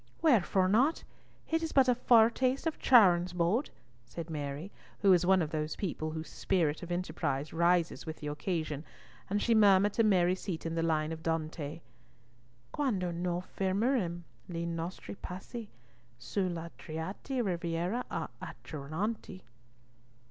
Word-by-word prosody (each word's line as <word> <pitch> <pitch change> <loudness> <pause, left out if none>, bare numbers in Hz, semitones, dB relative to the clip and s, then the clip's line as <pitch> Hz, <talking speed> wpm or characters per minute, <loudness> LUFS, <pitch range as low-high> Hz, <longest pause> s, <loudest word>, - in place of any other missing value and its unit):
"Wherefore 195 - +4
not? 250 - +3 0.4
It 325 0 +1
is 325 - -3
but 270 -2 +5
a 250 - +5
foretaste 245 +3 +3
of 325 - -2
Charon's 180 -8 +5
boat!" 180 - +1 0.3
said 165 +8 -7
Mary, 145 +4 -4 0.3
who 200 -2 +5
was 175 -1 +4
one 190 -2 +5
of 155 - -5
those 155 -1 -2
people 155 -5 -3
whose 160 0 -5
spirit 165 -6 0
of 175 -1 -7
enterprise 155 -5 -2
rises 170 0 +2
with 160 -1 -5
the 150 - -9
occasion, 150 0 -3 0.5
and 205 +2 +1
she 235 - +2
murmured 205 -2 +5
to 230 - +3
Mary 185 -4 +4
Seaton 170 -4 -4
the 165 - 0
line 160 -1 +1
of 160 0 -6
Dante— 160 -1 -3 0.9
"Quando 200 -12 -1
noi 175 +1 -2
fermerem 190 -1 -1 0.3
li 170 -1 -3
nostri 170 +1 -5
passi 205 +4 -8 0.5
Su 130 - -2
la 170 -1 -5
triate 190 - -4
riviera 175 +5 -1
a' - - -3
Acheronte." 180 +6 -5
175 Hz, 140 wpm, -31 LUFS, 160-205 Hz, 0.9 s, but